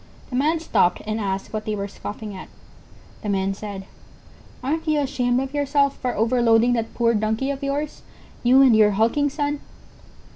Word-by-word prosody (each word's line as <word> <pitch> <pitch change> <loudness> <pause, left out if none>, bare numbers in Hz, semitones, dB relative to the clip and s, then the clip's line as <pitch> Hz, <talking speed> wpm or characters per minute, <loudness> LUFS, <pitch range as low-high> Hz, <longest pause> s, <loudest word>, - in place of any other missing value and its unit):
The - - -3
Man 310 +5 +2
stopped 180 - +1
and 215 +1 -2
asked 195 -1 -3
what 215 0 -3
they 215 - -1
were 200 -1 -3
scoffing 205 +1 -7
at. 185 - -9 0.7
The 210 - -4
men 195 -1 0
said: 195 -1 -7 0.8
"Aren't 320 +5 -2
you 305 -1 +2
ashamed 255 -3 0
of 270 +1 -4
yourself 285 -1 +1
for 250 - -2
overloading 230 +1 +3
that 230 -2 -2
poor 235 -1 +2
Donkey 220 +5 0
of 275 0 -5
yours—you 275 -2 0
and 250 -4 +6
your 210 -1 +5
hulking 230 +8 +2
son?" 290 0 -2
245 Hz, 170 wpm, -23 LUFS, 215-280 Hz, 0.8 s, and